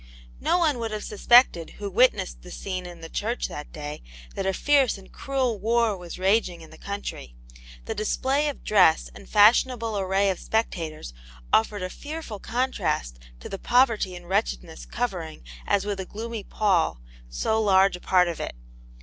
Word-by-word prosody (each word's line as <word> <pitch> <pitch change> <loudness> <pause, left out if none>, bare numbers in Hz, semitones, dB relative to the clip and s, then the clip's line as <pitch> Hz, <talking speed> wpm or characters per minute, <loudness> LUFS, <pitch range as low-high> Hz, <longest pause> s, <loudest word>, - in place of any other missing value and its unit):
No - - +2
one 310 -8 +2
would 230 -1 -2
have 215 -1 -4
suspected 215 -5 +4
who 205 - -5
witnessed 195 - +2
the - - -12
scene 185 -2 -5
in 175 -1 -11
the 165 - -7
church 225 +8 -2
that 150 - -8
day 150 -1 -7 0.3
that 190 - -3
a - - +3
fierce 275 +2 +2
and 195 - -15
cruel 260 -6 -1
war 230 +1 +2
was 175 -2 -9
raging 190 -2 +1
in 160 - -13
the 160 - -13
country; 200 - -6 0.5
the - - -3
display 270 +7 0
of 290 - -5
dress 165 -6 +4
and 200 - -13
fashionable 225 +1 +4
array 195 +1 +2
of 185 - -5
spectators 165 - -3 0.4
offered 210 -3 +2
a 185 - -3
fearful 295 -8 -7
contrast 230 - -2 0.2
to - - -7
the 195 - -6
poverty 230 -7 +2
and 175 -1 -11
wretchedness - - -2
covering, - - -4 0.2
as 200 0 +2
with 205 -1 -3
a 190 - -4
gloomy 225 0 -6
pall, 185 - +1 0.3
so 220 - 0
large 195 -2 +4
a - - -9
part 180 -1 +3
of 170 - -4
it. - - -5
200 Hz, 175 wpm, -25 LUFS, 175-230 Hz, 0.5 s, suspected